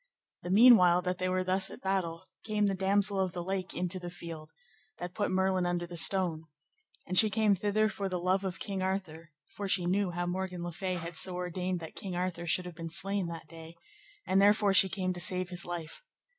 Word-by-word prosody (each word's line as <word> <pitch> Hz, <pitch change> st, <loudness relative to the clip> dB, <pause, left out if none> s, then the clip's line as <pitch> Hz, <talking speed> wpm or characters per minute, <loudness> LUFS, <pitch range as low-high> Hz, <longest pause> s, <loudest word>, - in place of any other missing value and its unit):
The 175 Hz, -, -7 dB
meanwhile 185 Hz, -4 st, +6 dB
that 180 Hz, 0 st, -2 dB
they 185 Hz, -, -1 dB
were 185 Hz, 0 st, 0 dB
thus 190 Hz, +1 st, 0 dB
at -, -, -8 dB
the -, -, -20 dB
battle, 190 Hz, -3 st, -2 dB, 0.2 s
came 210 Hz, -1 st, 0 dB
the 200 Hz, -, +1 dB
Damosel 195 Hz, +1 st, +1 dB
of 185 Hz, -2 st, -1 dB
the 175 Hz, -, -4 dB
Lake 190 Hz, 0 st, -4 dB
into 180 Hz, +1 st, -2 dB
the 175 Hz, -1 st, -7 dB
field, 165 Hz, -3 st, -9 dB, 0.5 s
that 175 Hz, 0 st, -6 dB
put 205 Hz, +1 st, -1 dB
Merlin 185 Hz, -1 st, +1 dB
under 175 Hz, 0 st, -1 dB
the 175 Hz, 0 st, -9 dB
stone; 170 Hz, -2 st, +4 dB, 0.6 s
and 185 Hz, 0 st, +3 dB
she 215 Hz, -, +5 dB
came 215 Hz, 0 st, +2 dB
thither 210 Hz, +3 st, +1 dB
for 200 Hz, -2 st, -4 dB
love 185 Hz, +2 st, 0 dB
of 190 Hz, -1 st, -4 dB
King 195 Hz, -2 st, -4 dB
Arthur, 185 Hz, -4 st, -4 dB, 0.2 s
for 205 Hz, -, -6 dB
she 185 Hz, -2 st, +2 dB
knew 190 Hz, +2 st, +1 dB
how 175 Hz, 0 st, -3 dB
Morgan 180 Hz, 0 st, -4 dB
le 175 Hz, -, -4 dB
Fay 185 Hz, +2 st, -3 dB
had 170 Hz, -1 st, -6 dB
so 180 Hz, +3 st, +1 dB
ordained 180 Hz, 0 st, -3 dB
that 160 Hz, -, -8 dB
King 190 Hz, -3 st, -6 dB
Arthur 175 Hz, -1 st, -3 dB
should 180 Hz, +2 st, +1 dB
have 180 Hz, -, -7 dB
been 165 Hz, 0 st, -7 dB
slain 195 Hz, +2 st, -1 dB
that 165 Hz, -1 st, -8 dB
day, 165 Hz, 0 st, -12 dB, 0.5 s
and 190 Hz, +2 st, +3 dB
therefore 205 Hz, 0 st, +4 dB
she 190 Hz, 0 st, +7 dB
came 185 Hz, -1 st, -2 dB
to 175 Hz, -, -6 dB
save 185 Hz, 0 st, +1 dB
his 180 Hz, -1 st, -4 dB
life. 170 Hz, -2 st, -6 dB
185 Hz, 220 wpm, -30 LUFS, 175-195 Hz, 0.6 s, she